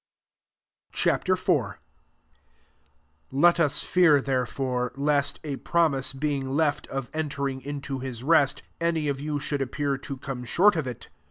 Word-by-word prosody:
Ch. - - -1
IV. - - +1 0.2
1 - - +2 1.6
Let 170 +6 +4
us 150 -4 +2
fear 165 -6 +5
there 130 -2 0
bre, 125 -1 -1
lest, 140 0 +1
a 145 -3 -4
promise 155 -6 +1
being 135 -1 -2
left 145 +1 0
if 135 -2 -3
Altering 140 -3 -2
into 140 -1 -5
his 125 -2 -6
rest, 145 -2 +3 0.2
any 165 -2 0
of 140 -1 -2
ftm 150 0 -2
should 145 0 -2
appear 140 +1 -1
to 135 0 -6
come 130 -1 -6
^ortofit. 150 - +1
140 Hz, 140 wpm, -26 LUFS, 135-150 Hz, 1.6 s, fear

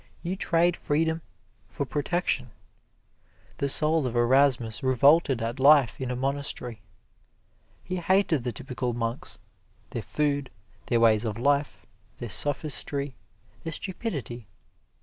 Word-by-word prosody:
You 180 +2 -2
trade 175 -1 +2
freedom 160 +2 0 0.5
for 140 - -4
protection. 145 -3 -1 1.1
The 140 - 0
soul 155 0 +2
of 120 - -5
Erasmus 120 -1 +3
revolted 135 0 +4
at 115 +4 -3
life 140 -3 +5
in 130 - -3
a 125 - -2
monastery. 130 -3 -3 1.0
He 185 +1 -4
hated 180 -4 +2
the 125 - -2
typical 125 -2 -4
monks 115 +1 -2 0.5
their - - -3
food, 145 -3 -1 0.4
their 120 - +2
ways 110 -2 +4
of 110 -2 -3
life, 140 +3 0 0.3
their 120 - -6
sophistry, 145 +2 +1 0.5
their 165 - -4
stupidity. 145 - -5
140 Hz, 120 wpm, -27 LUFS, 120-155 Hz, 1.1 s, life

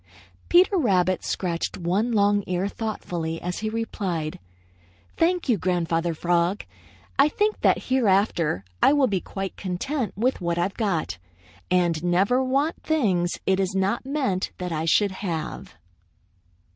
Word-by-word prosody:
Peter 370 +3 +5
Rabbit 185 - +2
scratched 170 -3 -2
one 190 +7 0
long 205 -2 +3
ear 180 +2 0
thoughtfully 175 -7 -4
as 180 0 -4
he 215 - -2
replied: 190 -8 -3 0.8
"Thank 350 0 +1
you, 230 -6 +2
Grandfather 170 -2 0
Frog. 175 +4 0 0.5
I 280 +2 +6
think 420 +6 0
that - - +3
hereafter 195 - +1 0.2
I - - +6
will 285 -2 +4
be 195 -7 0
quite 195 -1 -5
content 200 +5 -3
with 245 0 0
what 170 -1 -1
I've 180 +3 0
got 165 - -2 0.5
and 175 -3 +1
never 195 +9 +2
want 275 +5 0
things 190 - +1
it 190 0 +2
is 190 -1 -1
not 195 +4 0
meant 265 -9 -1
that 180 -1 -4
I 160 0 -1
should 200 +4 +3
have." 170 -5 -5
190 Hz, 140 wpm, -24 LUFS, 175-235 Hz, 0.8 s, I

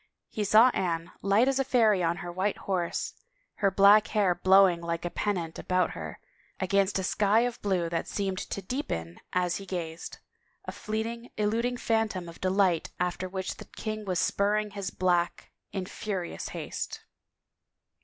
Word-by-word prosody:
He 215 - -2
saw 215 +5 +7
Anne, 170 -7 -2
light 200 +6 +3
as 270 0 +2
a - - +3
fairy 225 -7 +3
on 170 0 +1
her 175 - -4
white 190 +3 -1
horse, 180 -3 -1 0.4
her 200 - +3
black 200 +2 +6
hair 200 -4 +2
blowing 185 0 +5
like 170 0 -3
a 175 - -2
pennant 175 -5 -2
about 185 0 +1
her, - - -7 0.4
against 195 +1 +2
a 190 - -1
sky 205 +4 +3
of 245 -1 -2
blue 185 -4 0
that 165 0 -2
seemed 195 -2 -2
to 200 - -5
deepen 85 - -4
as 180 -1 +1
he 195 - -8
gazed; 170 -3 -5 0.5
a - - -4
fleeting, 230 +2 -4
eluding 230 +4 0
phantom 220 -7 0
of 170 - -11
delight 185 -3 +2
after 180 +1 -2
which 190 0 -4
the - - -10
king 215 -1 -5
was 185 -3 -2
spurring 210 +3 +1
his 200 -2 -4
black 175 -2 0 0.2
in 190 -2 -3
furious 190 -2 -4
haste. - - -5
195 Hz, 165 wpm, -28 LUFS, 180-215 Hz, 0.5 s, saw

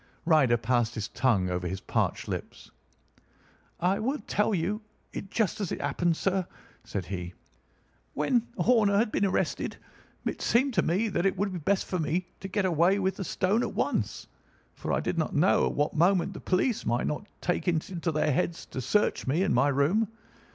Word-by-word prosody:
Ryder 145 -8 +4
passed 120 0 0
his 110 -3 -3
tongue 100 -9 +1
over 90 0 -2
his 95 +2 -3
parched - - -1
lips. - - -6 1.1
"I 180 +3 +2
will 265 +7 0
tell 210 +1 +1
you 195 +6 -1 0.3
it 195 - -6
just 215 -1 0
as 195 - -2
it - - -3
happened, 160 +4 0
sir," 190 -2 0 0.4
said 95 -4 -4
he. 90 -1 -5 0.8
"When 230 - +1
Horner 215 -5 +4
had 215 +1 +2
been 200 - +2
arrested, 190 - -1 0.5
it - - -3
seemed 260 +3 +2
to 180 - +3
me 190 +8 +1
that 180 0 +1
it 195 - -1
would 200 +1 -1
be 180 - -3
best 190 +5 +1
for 185 - -2
me 170 +3 0
to 195 - -6
get 195 0 0
away 175 +2 +3
with 190 -1 0
the 195 - -3
stone 195 +5 +1
at - - -3
once, - - -1 0.5
for - - -5
I - - +1
did 170 - -1
not 160 - -1
know 155 +6 +4
at - - -2
what 145 +1 +1
moment 180 +4 +3
the - - -8
police 195 +5 0
might 120 +2 0
not 150 +8 -3
take 175 +1 -1
it 170 +1 0
into 170 -2 -2
their 150 0 +1
heads 170 +3 -1
to 130 - -3
search 210 - +1
me 155 +8 +2
and 195 - +1
my 140 - +4
room. 145 +11 +2
175 Hz, 195 wpm, -28 LUFS, 145-200 Hz, 1.1 s, Ryder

